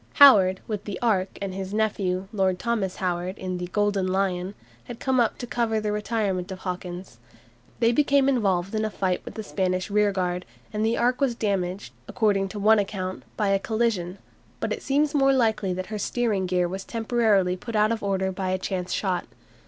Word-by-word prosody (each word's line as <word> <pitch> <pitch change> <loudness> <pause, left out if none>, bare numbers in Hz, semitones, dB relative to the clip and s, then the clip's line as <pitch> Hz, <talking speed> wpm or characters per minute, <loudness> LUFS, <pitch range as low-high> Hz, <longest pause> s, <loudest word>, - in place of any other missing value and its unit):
Howard, 195 -10 +7
with 210 -3 -4
the 200 -3 -4
"Ark," 200 -6 0
and 195 -1 -3
his 190 +1 -5
nephew, 195 -4 0
Lord 190 -3 +1
Thomas 210 -3 -1
Howard, 180 +1 -2
in 185 -1 -4
the 180 - -4
"Golden 205 0 0
Lion," 190 0 -1 0.3
had 240 - -8
come 260 -1 +1
up 235 -2 +2
to 245 - -5
cover 230 -2 0
the 210 -1 -2
retirement 210 -3 -1
of 190 - -5
Hawkins. 180 0 -6 0.6
They 230 0 +4
became 280 +1 +3
involved 195 -8 +1
in 215 0 0
a 215 - 0
fight 190 -3 -1
with - - -9
the 220 - -5
Spanish 185 -1 -1
rearguard, 190 -4 +1 0.3
and 210 0 -1
the 225 +1 +1
"Ark" 245 +3 +1
was 260 -4 +2
damaged, 190 - -2
according 195 -3 +1
to 210 - -7
one 215 +2 +5
account, 185 -2 -3 0.2
by 210 -2 +1
a 195 0 +3
collision, 210 -5 -1 0.4
but - - -1
it - - -6
seems 290 +2 +1
more 275 -2 +4
likely 220 -6 +1
that 185 +1 -3
her 210 - -2
steering 205 -3 0
gear 180 -1 +1
was 190 +2 -5
temporarily 220 -5 +1
put 225 +5 -7
out 215 +1 +3
of 230 - -1
order 190 -1 0
by 190 0 -3
a 185 - +1
chance 185 -1 -3
shot. 185 -3 -1
200 Hz, 195 wpm, -25 LUFS, 185-220 Hz, 0.6 s, Howard